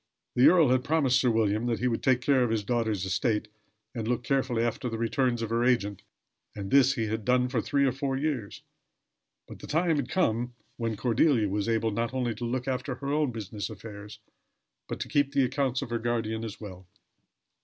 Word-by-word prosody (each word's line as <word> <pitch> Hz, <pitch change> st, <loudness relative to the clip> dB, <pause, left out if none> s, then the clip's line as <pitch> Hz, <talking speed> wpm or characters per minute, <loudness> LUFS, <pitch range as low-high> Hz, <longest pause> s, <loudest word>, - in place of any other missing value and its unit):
The 125 Hz, -, +6 dB
earl 165 Hz, -6 st, +6 dB
had 130 Hz, 0 st, +2 dB
promised 140 Hz, -3 st, +2 dB
Sir 125 Hz, -, +3 dB
William 110 Hz, 0 st, +1 dB
that 115 Hz, -2 st, 0 dB
he 125 Hz, -, 0 dB
would 115 Hz, -2 st, -1 dB
take 130 Hz, -2 st, +2 dB
care 130 Hz, -1 st, +3 dB
of 120 Hz, -, 0 dB
his 110 Hz, -2 st, 0 dB
daughter's 110 Hz, -3 st, -1 dB
estate 105 Hz, +3 st, 0 dB, 0.4 s
and 115 Hz, -3 st, -4 dB
look 125 Hz, 0 st, -1 dB
carefully 130 Hz, -3 st, 0 dB
after 120 Hz, +2 st, -2 dB
the 115 Hz, -, -4 dB
returns 120 Hz, +1 st, 0 dB
of 115 Hz, -, -4 dB
her 115 Hz, +1 st, +1 dB
agent, 105 Hz, -6 st, +1 dB, 0.5 s
and 100 Hz, -2 st, -6 dB
this 135 Hz, -1 st, +5 dB
he 115 Hz, -4 st, -1 dB
had 110 Hz, +1 st, -3 dB
done 125 Hz, +2 st, +2 dB
for 125 Hz, -3 st, 0 dB
three 140 Hz, +3 st, +1 dB
or 135 Hz, -, +3 dB
four 135 Hz, 0 st, -2 dB
years; 135 Hz, -8 st, -3 dB, 0.8 s
but -, -, -11 dB
the -, -, -10 dB
time 160 Hz, +1 st, +1 dB
had 135 Hz, -3 st, -2 dB
come 120 Hz, -8 st, 0 dB, 0.2 s
when 115 Hz, -3 st, -3 dB
Cordelia 120 Hz, -2 st, +2 dB
was 105 Hz, +2 st, -1 dB
able 115 Hz, -1 st, +1 dB
not 115 Hz, +4 st, -2 dB
only 125 Hz, -3 st, 0 dB
to 110 Hz, +3 st, -5 dB
look 125 Hz, +2 st, -2 dB
after 130 Hz, 0 st, -2 dB
her 140 Hz, +3 st, -3 dB
own 150 Hz, -3 st, +1 dB
business 110 Hz, -2 st, -5 dB
affairs, 105 Hz, -1 st, -9 dB, 0.7 s
but -, -, -5 dB
to -, -, -3 dB
keep 145 Hz, -2 st, +1 dB
the 140 Hz, -1 st, +3 dB
accounts 130 Hz, 0 st, 0 dB
of 120 Hz, -, -8 dB
her 120 Hz, -, 0 dB
guardian 115 Hz, -1 st, -2 dB
as 110 Hz, -2 st, -6 dB
well. 95 Hz, -4 st, -10 dB
120 Hz, 210 wpm, -28 LUFS, 110-130 Hz, 0.8 s, The